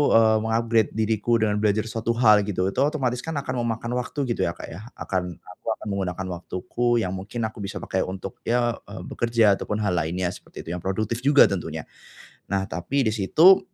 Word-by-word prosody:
eee, 110 -1 +6
meng-upgrade 115 0 +1
diriku 110 +1 +1
dengan 105 -2 +1
belajar 105 0 +2
suatu 115 +1 -2
hal 105 -4 +5
gitu 95 -1 0
otomatis 130 0 0
kan 160 +4 -5
akan 130 -3 -2
memakan 115 0 -2
waktu 140 +3 -3
gitu 120 -8 0
ya 85 - -3
Kak - - -8
ya 100 +8 -9
akan 90 -2 -3
aku 90 - -16
akan - - -10
menggunakan 95 -1 -2
waktuku 120 +7 -1
yang 90 - -2
mungkin 100 +5 -4
aku 110 +1 -4
bisa 100 0 -5
pakai 95 - -2
untuk 95 0 -6
ya 120 0 +2 0.2
eee - - -8
bekerja 115 -3 +2
atau - - -6
pun 105 0 -1
hal 100 - +1
lainnya 85 +2 -1
seperti - - -10
itu - - -9
yang 90 - -3
produktif 110 +5 -2
juga 140 +3 +6
tentunya. 80 -5 -1 0.7
Nah 95 0 0
tapi 95 +11 -1
di 110 - +1
situ, 160 - +6
110 Hz, 195 wpm, -24 LUFS, 95-120 Hz, 0.7 s, eee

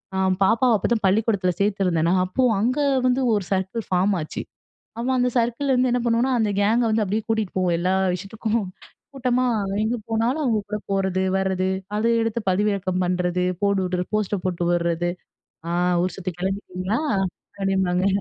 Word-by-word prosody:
அ - - -1 0.3
பாப்பாவ 230 +4 +3
அப்போதா 235 +4 +1
பள்ளிக்கூடத்துல 200 -2 +2
சேர்த்திருந்தனா, 185 -4 +1
அப்போ 185 +8 -1 0.2
அங்க 250 +7 +1 0.3
வந்து, 255 +1 +2
ஒரு 205 -2 +1
சர்க்கள் 190 +4 -1
ஃபாம் 190 +2 +2
ஆச்சு. 155 - -5 0.6
அவ, 235 - -3
அந்த 250 0 +2
சர்க்கள்ல 240 +4 +1
வந்து 250 0 +2
என்ன 245 - +1
பண்ணுவோனா, 235 +3 +2
அந்த 210 -2 +1
கேங்க 225 +4 +3
வந்து 215 -1 +2
அப்டியே 210 +3 -2
கூட்டிட்டு 220 -4 -1
போவோ. 185 -1 +1
எல்லா 185 +2 +1 0.2
விஷயத்துக்கு 200 +4 -5 0.6
கூட்டமா, 255 -1 +1 0.4
எங்க 230 +3 0
போனாலு 230 +6 0
அவங்க 230 -5 +2
கூட 210 0 -2
போறது, 190 -1 0 0.2
வரது 190 -1 0 0.3
அத 215 - -1 0.2
எடுத்து 225 +1 -1
பதிவிறக்கம் 185 -1 0
பண்றது. 180 0 0 0.2
போடுவுட்டு 185 -3 0
போஸ்ட்டை 210 -2 0
போட்டுவுறது. 175 -1 0 0.6
ஆ - - -2 0.3
ஊர் 185 - -2
சுத்த 185 -1 -4
கெளம்பிட்டீங்களா? 190 +2 -2 0.6
அப்டிபாங்க. 190 -1 +1
200 Hz, 150 wpm, -23 LUFS, 185-230 Hz, 0.6 s, பாப்பாவ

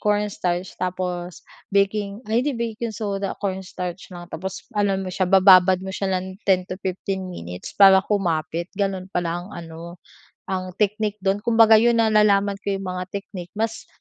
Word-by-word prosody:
cornstarch 205 -4 -1
tapos 180 -1 -3 0.3
baking 200 +2 0
ay 230 - +4
hindi 290 +2 0
baking 230 0 -3
soda, 200 -2 -3
cornstarch 185 -2 -5
lang, 175 -1 -8
tapos 190 +3 -5
ano 200 -2 +2
mo 185 -1 -5
siya, 185 -1 0
bababad 185 -1 +7
mo 190 - -5
siya 190 0 -2
ng 185 +2 -6
10 185 -1 +4
to 185 - -5
15 190 0 -3
minutes 90 - -8
para 195 -1 +8
kumapit, 170 -4 -1
gano'n 195 -2 -2
pala 175 0 -2
ang 190 - -12
ano, 170 +1 -9 0.5
ang 185 -1 -3
technique 210 0 0
do'n. 195 +1 +1
Kumbaga 225 -1 +6
'yun 235 0 +3
nalalaman 210 -2 +4
ko - - -6
'yung 195 - -6
mga 180 0 -4
technique, 195 -3 -7
mas 225 +1 -2
190 Hz, 165 wpm, -23 LUFS, 180-205 Hz, 0.5 s, para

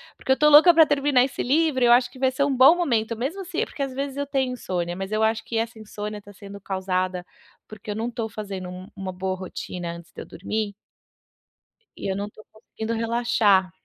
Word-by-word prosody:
porque - - -3
eu 265 - +4
tô 300 - +4
louca 305 +4 +9
pra 320 -1 +7
terminar 285 -3 +3
esse 270 - -5
livro, 285 -1 +2
eu 240 - +5
acho 245 0 +4
que 260 - -14
vai 260 0 +3
ser 260 +2 0
um 280 -2 +1
bom 265 +6 +7
momento, 235 -10 0
mesmo, 285 - -3
assi 350 -3 -3
é - - +1
porque 300 - -9
às 275 -1 -1
vezes 275 +1 -4
eu 285 0 -2
tenho 265 -2 0
insônia, 175 -7 -3
mas 190 +2 -5
eu 215 +1 +1
acho 220 0 +1
que 230 - -4
essa 225 0 -3
insônia 210 -1 -6
tá 205 - -14
sendo 200 0 -11
causada 185 -1 -2 0.4
porque 215 0 -11
eu 205 - -2
não 230 +3 -3
tô 230 -2 -4
fazendo 195 -3 -6
um 180 +1 -9
uma 190 -1 -5
boa 185 +1 -3
rotina 180 -2 -6
antes 170 0 -13
de - - -8
eu - - -8
dormir 205 +3 -4 1.2
e - - -4
eu - - -2
não 200 +1 -4
tô 215 - -16
conseguindo 220 0 -6
relaxar 225 -5 +2
220 Hz, 230 wpm, -24 LUFS, 195-265 Hz, 1.2 s, louca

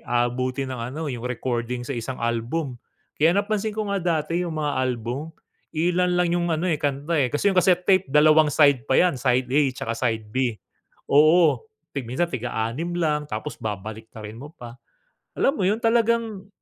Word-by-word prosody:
aabutin 130 +2 -1
ng 125 - -6
ano, 155 +4 -5
yung 120 -2 -6
recording 120 0 -3
sa 140 - -3
isang 120 +2 -5
album. 120 +4 -2 0.4
Kaya 160 +3 +5
napansin 215 +1 0
ko 215 -2 -3
nga 200 - +1
dati 165 0 0
yung 160 -2 -5
mga 150 -2 -1
album, 125 +4 -3 0.4
iilan 180 +2 +1
lang 175 -1 +2
'yung 175 0 0
ano 160 +3 -1
eh, 155 - 0
kanta 145 +3 -1
eh, 130 -3 +2
kasi 145 +9 -1
yung 185 - -6
cassette 180 0 +3
tape, 190 -4 +4
dalawang 155 +1 +5
side 140 -5 +4
pa - - +5
yan. 180 -3 +4
Side 130 -1 +2
A 145 +3 +4
tsaka 115 -2 -4
side 110 -3 -1
B. 125 -4 0 0.5
Oo, 155 - +5 0.3
tig 135 -5 -4
minsan 150 +8 0
tig-a-anim 125 +6 -3
lang 150 -3 0
tapos 120 +6 -5
babaliktarin 110 +1 -7
mo 145 +5 -10
pa. 120 -4 -11 0.6
Alam 275 - +2
mo - - +1
yun, 210 - +2
talagang 230 -3 +1
145 Hz, 175 wpm, -24 LUFS, 120-175 Hz, 0.6 s, Kaya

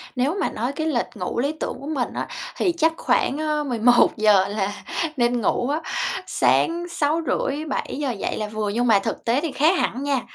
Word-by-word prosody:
Nếu 280 +9 0
mà - - +1
nói 240 +5 -2
cái 315 +2 -2
lịch 250 -6 +1
ngủ 185 +4 -3
lý 280 +4 +1
tưởng - - -3
của 280 - -8
mình 275 -6 -2
á - - -3 0.3
thì 360 - +2
chắc 320 0 +3
khoảng, 275 - +1
ơ 305 -1 0
11:00 220 -5 +4
là 205 -1 -2 0.4
nên 240 0 +2
ngủ 245 +5 0
á, 305 +3 0 0.5
sáng 345 +1 +2
6:30-7:00 295 -3 -1
dậy 205 - -3
là 215 - -2
vừa. 215 0 -3
Nhưng 240 +4 0
mà 210 -3 +5
thực - - -4
tế 245 +5 +2
thì 325 -4 -2
khác 325 +6 +3
hẳn 260 +4 -1
nha, 275 -3 +1
265 Hz, 190 wpm, -23 LUFS, 230-305 Hz, 0.5 s, mà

